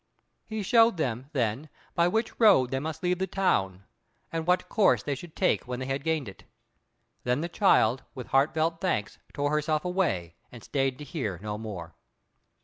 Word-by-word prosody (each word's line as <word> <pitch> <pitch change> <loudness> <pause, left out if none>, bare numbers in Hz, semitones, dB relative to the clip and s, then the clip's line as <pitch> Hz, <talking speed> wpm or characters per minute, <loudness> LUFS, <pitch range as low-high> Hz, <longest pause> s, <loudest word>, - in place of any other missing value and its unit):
He 220 -1 -3
showed 230 -2 +5
them, 130 -3 -2
then, 130 +1 -1 0.2
by 170 0 +3
which 220 +5 -1
road 195 - +5
they 135 - 0
must 160 +3 -5
leave 180 0 +1
the 190 - 0
town, 95 - 0 0.5
and 165 0 -3
what 180 +1 +2
course 215 -4 +3
they 145 - -1
should 155 +4 -9
take 185 - +1
when 125 0 -4
they 130 - -4
had 135 +1 -2
gained 160 -5 0
it. 95 - -11 0.8
Then 125 +3 0
the 170 - -2
child, 135 - +3
with 125 - -6
heartfelt 160 +4 +2
thanks, 105 - -1
tore 145 0 -1
herself 150 +1 0
away, 165 - 0 0.2
and 120 -2 -12
stayed 135 -2 -1
to 150 - -8
hear 130 - -4
no 105 -1 -3
more. 95 -7 -7
145 Hz, 180 wpm, -28 LUFS, 125-175 Hz, 0.8 s, showed